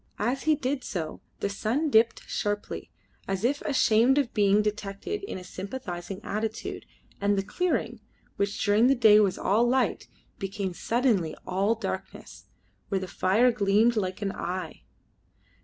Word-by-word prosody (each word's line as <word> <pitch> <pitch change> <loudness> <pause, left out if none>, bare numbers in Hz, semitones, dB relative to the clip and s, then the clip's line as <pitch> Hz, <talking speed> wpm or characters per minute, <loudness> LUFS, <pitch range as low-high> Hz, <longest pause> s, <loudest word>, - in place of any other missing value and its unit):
As 250 +7 -1
he 310 -1 +4
did 275 -1 -2
so 160 -5 -4 0.2
the - - +1
sun 230 +9 -1
dipped 225 0 +3
sharply, 205 0 -3 0.4
as 195 +1 -2
if 280 +4 +1
ashamed 260 -2 +3
of 275 -5 +1
being 205 0 +4
detected 210 - -3
in - - -5
a 185 - -8
sympathising 190 -2 -6
attitude, 215 +1 -4 0.3
and 200 0 +2
the 195 - +1
clearing, 245 - -1 0.4
which 200 0 -1
during 210 +4 +4
the 275 - +4
day 220 -4 +7
was 200 -3 +2
all 210 +5 +2
light, 260 +1 +1 0.3
became 195 -1 -3
suddenly 225 -6 +1
all 195 +5 +1
darkness, 225 - -6 0.4
where 195 - +1
the 185 - -5
fire 210 +8 +3
gleamed 215 +2 +3
like 190 -1 -2
an 195 - -1
eye. 185 0 -5
210 Hz, 150 wpm, -27 LUFS, 195-245 Hz, 0.4 s, day